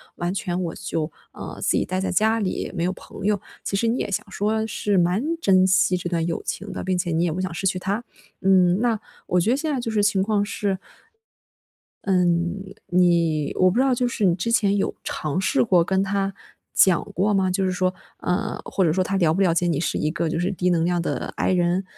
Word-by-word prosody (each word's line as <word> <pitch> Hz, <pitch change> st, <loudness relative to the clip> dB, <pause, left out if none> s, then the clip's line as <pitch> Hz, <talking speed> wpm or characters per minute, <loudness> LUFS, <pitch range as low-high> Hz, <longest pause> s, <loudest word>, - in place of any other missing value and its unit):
完 175 Hz, +1 st, -2 dB
全 180 Hz, -2 st, -2 dB
我 165 Hz, -, -3 dB
就， 160 Hz, 0 st, -3 dB, 0.2 s
呃， -, -, -8 dB
自 -, -, +1 dB
己 -, -, +2 dB
待 185 Hz, 0 st, -2 dB
在 190 Hz, -, -1 dB
家 220 Hz, +4 st, +2 dB
里， 195 Hz, -4 st, -2 dB
没 170 Hz, -2 st, -1 dB
有 185 Hz, -, 0 dB
朋 195 Hz, -, -10 dB
友， 205 Hz, -1 st, +2 dB, 0.3 s
其 -, -, -1 dB
实 195 Hz, -, 0 dB
你 235 Hz, -, +1 dB
也 -, -, -2 dB
想 195 Hz, -, -2 dB
说 220 Hz, +2 st, 0 dB
是 205 Hz, -2 st, -1 dB
蛮 180 Hz, +4 st, +2 dB, 0.2 s
珍 185 Hz, -, +4 dB
惜 190 Hz, -1 st, +3 dB
这 175 Hz, -1 st, -4 dB
段 165 Hz, -2 st, 0 dB
友 170 Hz, -1 st, -2 dB
情 -, -, -5 dB
的， -, -, -5 dB
并 185 Hz, -1 st, 0 dB
且 175 Hz, -1 st, -1 dB
你 165 Hz, +2 st, +1 dB
也 165 Hz, -, 0 dB
不 185 Hz, -, -3 dB
想 185 Hz, -3 st, -3 dB
失 195 Hz, +3 st, -1 dB
去 185 Hz, -1 st, 0 dB
他。 195 Hz, +5 st, -2 dB, 0.4 s
嗯， 185 Hz, -1 st, +4 dB
那 235 Hz, -2 st, +2 dB, 0.3 s
我 180 Hz, 0 st, +2 dB
觉 215 Hz, +7 st, +2 dB
得 260 Hz, -, +2 dB
现 315 Hz, +2 st, -2 dB
在 -, -, -2 dB
就 230 Hz, -, -3 dB
是 215 Hz, -1 st, +1 dB
情 205 Hz, -2 st, +2 dB
况 205 Hz, 0 st, +1 dB
是 200 Hz, -2 st, -2 dB, 1.3 s
嗯， 175 Hz, -1 st, +1 dB, 0.3 s
你 170 Hz, -4 st, +2 dB
我 185 Hz, 0 st, +4 dB
不 180 Hz, -, -3 dB
知 -, -, +4 dB
道 265 Hz, -1 st, +3 dB
就 245 Hz, 0 st, 0 dB
是 220 Hz, -3 st, -2 dB
你 175 Hz, -2 st, +4 dB
之 185 Hz, +6 st, -2 dB
前 205 Hz, -4 st, +3 dB
有 200 Hz, -, 0 dB
尝 155 Hz, +4 st, -2 dB
试 -, -, +2 dB
过 180 Hz, -7 st, +4 dB
跟 190 Hz, +1 st, +1 dB
他 195 Hz, 0 st, -1 dB, 0.4 s
讲 185 Hz, -3 st, +5 dB
过 200 Hz, +3 st, +1 dB
吗？ 190 Hz, -2 st, +2 dB
就 190 Hz, +1 st, 0 dB
是 185 Hz, -, +1 dB
说 185 Hz, 0 st, 0 dB, 0.2 s
呃， 180 Hz, +1 st, -2 dB
或 190 Hz, -, 0 dB
者 160 Hz, -, +3 dB
说 185 Hz, +2 st, +1 dB
他 195 Hz, -, -1 dB
了 165 Hz, -4 st, +3 dB
不 190 Hz, -, -1 dB
了 180 Hz, -4 st, +3 dB
解 175 Hz, +1 st, +1 dB
你 160 Hz, -, 0 dB
是 155 Hz, -, -1 dB
一 150 Hz, -, 0 dB
个 170 Hz, 0 st, -1 dB
就 165 Hz, +1 st, -1 dB
是 180 Hz, -, 0 dB
低 180 Hz, -2 st, -1 dB
能 170 Hz, -2 st, +2 dB
量 175 Hz, 0 st, +1 dB
的 170 Hz, -, -3 dB
I -, -, +1 dB
人？ 180 Hz, +1 st, +1 dB
185 Hz, 260 characters per minute, -23 LUFS, 175-200 Hz, 1.3 s, 讲